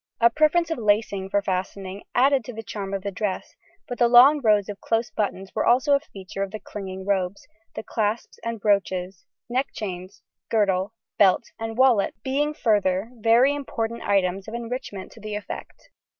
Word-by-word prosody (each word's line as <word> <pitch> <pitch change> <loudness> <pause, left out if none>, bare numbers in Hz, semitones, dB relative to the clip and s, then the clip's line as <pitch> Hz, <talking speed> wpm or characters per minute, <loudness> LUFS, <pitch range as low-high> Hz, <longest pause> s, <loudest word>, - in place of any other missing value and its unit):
A 235 0 +5
preference 310 +4 +2
of 325 - -2
lacing 205 -3 +1
for 200 0 +1
fastening 190 +1 -3
added 270 +1 +4
to 245 - -7
the 225 0 -7
charm 200 -2 -5
of 195 -1 -3
the 200 - -3
dress, 195 0 -3 0.3
but 245 - -6
the 240 - +5
long 260 +5 +7
rows 210 -4 +3
of 205 -1 -7
close 230 +1 0
buttons 195 -2 -3
were 215 - 0
also 260 +4 +4
a 280 - +5
feature 195 -8 -9
of 195 - -1
the 215 +2 -7
clinging 190 -2 -7
robes, 195 -1 -1 0.3
the - - -5
clasps 220 +1 -2
and 230 -1 -3
brooches, 190 -3 0 0.2
neck 255 +3 0
chains, 185 -2 -6 0.3
girdle, 200 -1 +1 0.2
belt, 195 +3 +4
and 225 0 -5
wallet 250 -6 +4
being 295 +3 0
further 205 -2 +1
very 235 +5 +5
important 235 -5 -4
items 195 0 0
of 220 - -6
enrichment 235 -5 -6
to - - -14
the 215 -1 -5
effect. 210 - -8
215 Hz, 180 wpm, -24 LUFS, 195-240 Hz, 0.3 s, long